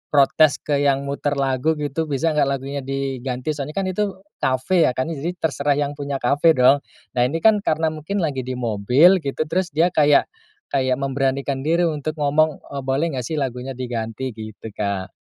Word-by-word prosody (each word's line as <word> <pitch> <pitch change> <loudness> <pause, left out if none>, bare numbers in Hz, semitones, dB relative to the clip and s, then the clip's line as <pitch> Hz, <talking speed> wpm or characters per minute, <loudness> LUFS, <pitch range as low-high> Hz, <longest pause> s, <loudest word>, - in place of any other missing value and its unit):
protes 145 +2 +5
ke 145 -2 0
yang 140 -1 +2
muter 140 +1 -2
lagu 135 +3 +1
gitu, 150 +2 -3
bisa 150 +3 0
nggak 150 -2 +2
lagunya 140 +1 -3
diganti, 135 0 -3
soalnya 150 0 -5
kan 195 - 0
itu 190 +1 -1 0.2
kafe 150 +6 +2
ya 125 - -1
kan 130 +6 -2
jadi 165 +4 -4
terserah 145 -4 0
yang 145 0 -1
punya 145 -1 -4
kafe 145 +6 +4
dong. 130 +3 +5 0.3
Nah 120 - 0
ini 165 +4 -4
kan 220 -2 +6
karena 160 -4 0
mungkin 165 +5 -3
lagi 140 -4 -1
di 130 0 -4
mobil 125 - +4
gitu 140 +1 -2
terus 175 +4 -1
dia 170 +2 +3
kayak 145 -2 +4 0.5
kayak 130 -2 +1
memberanikan 135 0 -1
diri 170 +2 +3
untuk 155 -1 -2
ngomong, 150 +1 +1
"Oh 140 - -4
boleh 135 +5 -1
nggak 125 -3 -4
sih 160 - -3
lagunya 130 -2 -3
diganti?" 120 0 -4
Gitu, 110 0 -9
Kak. 100 -2 -3
140 Hz, 185 wpm, -21 LUFS, 130-155 Hz, 0.5 s, kan